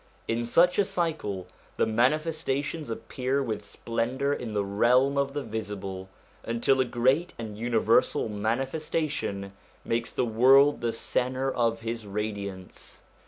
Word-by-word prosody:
In 115 +1 -1
such 175 - +4
a - - +6
cycle 160 - -2 0.3
the - - +3
Manifestations 145 +4 0
appear 130 +4 -2
with 110 -4 -3
splendour 120 +6 -2
in 115 -6 -5
the 100 -1 +1
realm 125 +7 +3
of 140 0 0
the 145 - -2
visible, 100 -4 -5 0.3
until 120 +3 +2
a - - +2
great 130 +8 +1
and 110 -3 -6
universal 115 0 +2
Manifestation 115 -1 -2 0.3
makes 115 0 -1
the 125 - 0
world 135 +5 +5
the 120 -1 0
centre 130 +3 -1
of 115 -1 0
his 115 -1 -4
radiance. 100 -2 -6
120 Hz, 130 wpm, -27 LUFS, 110-140 Hz, 0.3 s, a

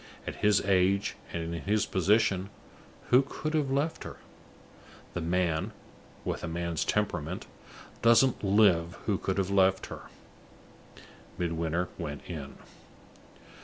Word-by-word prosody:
At - - -5
his 105 -1 +3
age, 95 0 +2 0.2
and 85 0 -3
in 85 - -4
his 105 +2 +1
position, 100 0 +2 0.6
who 125 +2 +8
could 155 +3 -5
have 150 -3 +1
left 145 +4 0
her? - - -8 1.0
The 90 - -3
man 85 -1 0 0.5
(with - - -3
a - - -2
man's 85 -1 -2
temperament) - - -1 0.6
doesn't 120 +2 +4
live 95 -4 +4
who 100 -3 +1
could 95 - -2
have 95 0 0
left 95 -1 +3
her. - - -10 1.3
Midwinter 85 0 -1
went 75 -4 -5
in. 75 -6 -6
95 Hz, 125 wpm, -29 LUFS, 85-105 Hz, 1.3 s, who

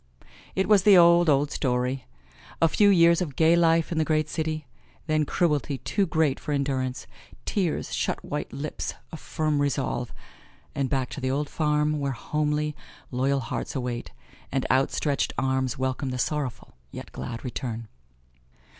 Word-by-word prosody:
It 190 - +1
was 210 -2 +6
the 200 0 +7
old, 170 -1 +6
old 145 0 +3
story 125 0 -1 0.5
a 165 - +5
few 205 +5 +4
years 170 -2 +5
of 150 -7 -3
gay 165 +1 +5
life 165 -1 +3
in 165 - 0
the - - +3
great 155 -1 0
city, 155 -1 -3 0.4
then 155 -1 +1
cruelty 145 -4 0
too 195 +8 0
great 155 -4 +1
for 150 - -3
endurance, 130 -2 -1 0.4
tears, 185 -6 -1
shut - - -2
white 150 - -4
lips, 150 +2 -4 0.2
a 160 - -6
firm 155 -2 -1
resolve 135 -3 -1 0.6
and 135 -2 -1
back 130 -2 -1
to 145 - -6
the 130 - -1
old 145 +2 -1
farm 150 -1 +1
where 140 -1 -1
homely, 150 +3 -1 0.4
loyal 135 +2 +1
hearts 115 - -4
await, 125 -2 -3 0.4
and 135 - -1
outstretched 135 +2 +1
arms 130 -1 0
welcome 130 +1 -2
the 125 - -3
sorrowful, 135 -1 -3 0.2
yet - - -9
glad 115 +1 -6
return. 115 -2 -4
145 Hz, 155 wpm, -26 LUFS, 130-160 Hz, 0.6 s, the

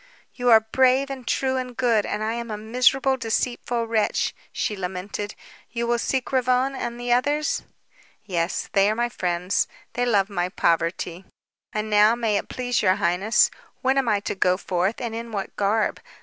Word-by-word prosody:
"You 245 -1 0
are 225 -1 +9
brave 260 +4 +2
and 260 -3 -7
true 265 -1 0
and 250 -2 -5
good, 230 -4 +2
and 210 +1 -2
I 220 +1 -1
am 235 0 -5
a 210 - -3
miserable, 250 +4 +2
deceitful 240 0 -1
wretch," 225 -2 0 0.2
she 210 - -2
lamented. 190 +2 -5 0.3
"You 235 0 -2
will 235 0 +1
seek 260 +1 -1
Ravone 255 +1 +2
and 240 -2 -4
the 245 0 +1
others?" 290 +5 +1 0.6
"Yes. 175 -3 -1
They 195 +1 +4
are 215 - 0
my 240 +1 0
friends. 180 -2 0 0.3
They 245 +1 0
love 200 -4 +3
my 180 -3 -2
poverty. 170 +1 0 0.5
And 215 0 -2
now, 210 +2 +5
may 225 -3 0
it - - -4
please 245 -1 -1
your 185 -2 +4
highness, 180 +6 +2 0.3
when 260 +1 +3
am 255 -4 0
I 205 -2 +2
to - - -3
go 185 -1 +2
forth 185 +3 -1
and 235 -2 -4
in 230 0 -6
what 200 -2 -4
garb? 210 +2 +1
225 Hz, 180 wpm, -24 LUFS, 200-245 Hz, 0.6 s, are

